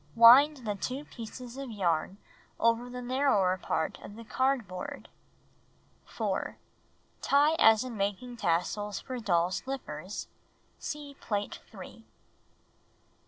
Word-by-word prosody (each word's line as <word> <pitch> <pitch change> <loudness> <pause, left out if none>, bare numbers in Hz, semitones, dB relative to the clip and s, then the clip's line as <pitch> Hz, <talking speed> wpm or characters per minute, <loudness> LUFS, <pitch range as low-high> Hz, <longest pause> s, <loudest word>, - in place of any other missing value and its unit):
Wind 255 +4 +8
the 210 - 0
2 255 +8 -4
pieces 245 +1 -9
of 275 -2 -5
yarn 185 -3 0 0.4
over 230 +1 +2
the 250 0 -6
narrower 245 -8 +2
part 160 -2 -2
of 205 - -10
the 230 - -9
cardboard. 230 -7 -2 1.0
4. - - -3 0.6
Tie 290 +3 +4
as 225 0 +6
in 250 -2 -6
making 205 +5 -2
tassels 195 +3 -1
for 255 -2 -6
doll's 180 -4 +1
slippers. 270 0 -6 0.5
(See 295 -1 -6
Plate 205 -1 -3
3.) - - -10
5. - - -18
230 Hz, 120 wpm, -30 LUFS, 200-260 Hz, 1.0 s, Wind